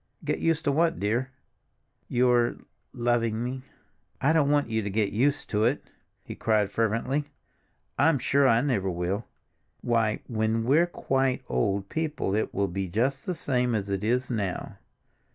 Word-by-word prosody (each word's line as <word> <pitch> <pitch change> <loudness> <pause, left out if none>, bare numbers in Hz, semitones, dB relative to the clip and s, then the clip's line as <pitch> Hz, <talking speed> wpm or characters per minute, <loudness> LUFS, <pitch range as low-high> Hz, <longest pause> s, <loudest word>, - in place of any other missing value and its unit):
"Get - - -1
used 165 -1 +1
to 145 - +2
what, 165 +3 +1
dear?" 115 +6 0 0.8
"Your—loving 120 -1 0
me." 130 +1 -4 0.6
"I 140 +4 +3
don't 150 -3 +3
want 145 0 +2
you 110 -1 -1
to 100 - -3
get 105 0 0
used 140 +6 +1
to 105 +1 +2
it!" 130 +5 -1 0.3
he - - -7
cried 105 -3 +1
fervently. 115 +6 0 0.7
"I'm 160 +1 +4
sure 140 +2 +3
I 115 -1 +4
never 115 -9 0
shall. 90 +5 -2 0.5
Why, 115 -3 +1
when 110 0 0
we're 150 +8 +4
quite 135 -6 0
old 100 -3 0
people 155 -10 -2
it 110 - 0
will 100 - 0
be 95 +1 -3
just 130 +9 -1
the 180 - -1
same 125 -5 0
as 100 -2 -2
it 100 0 -2
is 125 +4 0
now. 100 -6 -3
120 Hz, 155 wpm, -27 LUFS, 105-140 Hz, 0.8 s, I'm